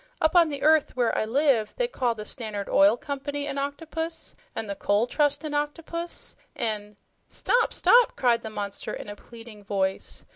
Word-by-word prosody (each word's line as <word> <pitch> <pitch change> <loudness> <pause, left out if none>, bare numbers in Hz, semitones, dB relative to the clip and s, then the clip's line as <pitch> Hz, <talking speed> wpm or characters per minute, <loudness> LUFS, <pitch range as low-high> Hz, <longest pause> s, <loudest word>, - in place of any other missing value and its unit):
"Up 315 +3 +2
on 340 -2 +6
the 285 -2 -5
earth, 310 -2 +4
where 240 -2 +2
I - - +1
live, 245 -2 +2
we - - +2
call 245 - -1
the 210 - -6
Stannerd 215 -5 -4
Oil 200 +4 +5
Company 285 +2 -4
an 280 -1 -3
octopus, 320 +3 -4 0.2
an' - - -3
the 200 - -3
Coal 205 +3 +1
Trust 290 +2 +1
an 305 -1 -4
octopus, 330 +3 -3 0.2
an' 210 -3 -3
" - - -45
"Stop, 485 -1 +1
stop!" 485 0 +5
cried 240 -2 +2
the 220 - -6
monster 205 -2 -5
in - - -8
a 205 - -6
pleading 225 -1 -13
voice. 195 -1 -2
260 Hz, 185 wpm, -26 LUFS, 215-300 Hz, 0.2 s, on